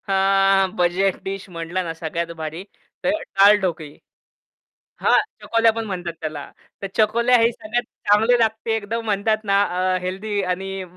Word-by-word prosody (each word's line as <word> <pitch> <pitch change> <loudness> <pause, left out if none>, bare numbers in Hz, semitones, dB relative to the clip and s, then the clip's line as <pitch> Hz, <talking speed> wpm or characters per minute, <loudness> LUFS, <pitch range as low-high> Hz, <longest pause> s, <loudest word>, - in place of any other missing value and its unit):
हां, 195 0 +3
budget 180 +2 +1
dish 195 0 -6
म्हटला 170 +1 -4
ना, 165 -2 -4
सगळ्यात 170 +1 -4
भारी 160 +3 -5 0.4
तर 275 - +2
डाळ 205 -10 +4
ढोकळी. 160 -5 -4 1.0
हां, - - +4 0.2
चकोल्या 230 0 +3
पण 225 0 -4
म्हणतात 175 -4 -4
त्याला 155 -2 -4 0.4
तर 195 - -3
चकोल्या 235 +3 +4
हे 230 +1 +4
सगळ्यात 230 +1 -3 0.2
चांगली 220 +4 +4
लागते 225 0 0
एकदम 225 +2 -3
म्हणतात 215 +1 0
ना, 200 -1 +2 0.3
अ, - - +1
हेल्दी 200 +3 -3
आणि 195 +1 -5
195 Hz, 150 wpm, -21 LUFS, 180-220 Hz, 1.0 s, डाळ